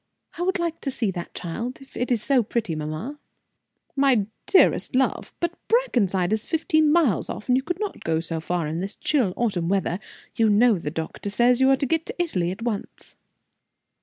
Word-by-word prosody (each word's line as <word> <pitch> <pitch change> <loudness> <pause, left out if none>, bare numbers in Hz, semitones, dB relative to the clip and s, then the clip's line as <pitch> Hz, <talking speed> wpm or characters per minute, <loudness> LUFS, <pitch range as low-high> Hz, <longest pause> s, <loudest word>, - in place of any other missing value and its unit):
I 340 - -6
would 370 +1 +1
like 340 -2 -3
to 275 - -2
see 240 -6 -1
that 175 -2 -7
child, 230 +9 -4
if 270 - -17
it 245 +1 -2
is 235 -3 +2
so 270 -3 +4
pretty, 225 -4 -2
mamma." 155 - -5 0.8
"My 270 -7 +3 0.2
dearest 375 - +4
love! 265 0 +1
But 345 0 -1
Brackenside 210 - +2
is 220 0 -2
fifteen 315 -1 +2
miles 300 - +2
off, 210 - -6
and 250 - +4
you 260 - +2
could 355 +6 -4
not 420 -2 -4
go 160 0 +1
so 165 0 -2
far 170 0 -2
in 155 +2 -3
this 195 +3 -4
chill 255 -11 +1
autumn 195 -8 0
weather. 190 -2 0 0.3
You 225 -1 +3
know 210 -1 +4
the 150 - -3
doctor 160 +5 -5
says 240 +4 +3
you 265 - +6
must 270 0 +3
get 325 +4 0
to - - -7
Italy 185 - 0
at 190 +5 -5
once." 220 -4 -5
235 Hz, 195 wpm, -24 LUFS, 180-280 Hz, 0.8 s, you